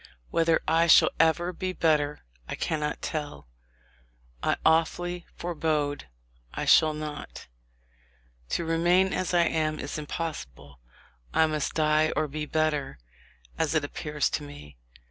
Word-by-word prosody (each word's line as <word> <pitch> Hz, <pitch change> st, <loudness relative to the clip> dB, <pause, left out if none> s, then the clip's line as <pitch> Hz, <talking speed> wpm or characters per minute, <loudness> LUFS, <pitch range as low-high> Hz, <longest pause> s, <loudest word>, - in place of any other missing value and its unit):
Whether 165 Hz, -1 st, +3 dB
I 165 Hz, +1 st, +3 dB
shall -, -, +7 dB
ever 170 Hz, +2 st, +2 dB
be 185 Hz, +1 st, -3 dB
better, 150 Hz, -4 st, +1 dB, 0.3 s
I -, -, -3 dB
cannot 150 Hz, -2 st, -2 dB
tell; 150 Hz, -, -5 dB, 0.9 s
I -, -, +1 dB
awfully 175 Hz, +2 st, +1 dB
forebode 150 Hz, -, -2 dB, 0.5 s
I -, -, -2 dB
shall 155 Hz, -1 st, +5 dB
not. 150 Hz, -1 st, -7 dB, 1.0 s
To 170 Hz, -, -1 dB
remain 175 Hz, +3 st, +3 dB
as 185 Hz, -, -1 dB
I 170 Hz, -, +5 dB
am 155 Hz, -2 st, 0 dB
is 145 Hz, +2 st, -5 dB
impossible. 70 Hz, -, -6 dB, 0.6 s
I 160 Hz, -, +5 dB
must 155 Hz, -2 st, -2 dB
die 155 Hz, 0 st, +3 dB
or 155 Hz, 0 st, 0 dB
be 150 Hz, +1 st, -5 dB
better, 150 Hz, -, -1 dB, 0.6 s
as 160 Hz, 0 st, 0 dB
it 155 Hz, -, +2 dB
appears 150 Hz, 0 st, -2 dB
to -, -, -1 dB
me. 145 Hz, -, -11 dB
155 Hz, 130 wpm, -27 LUFS, 150-165 Hz, 1.0 s, shall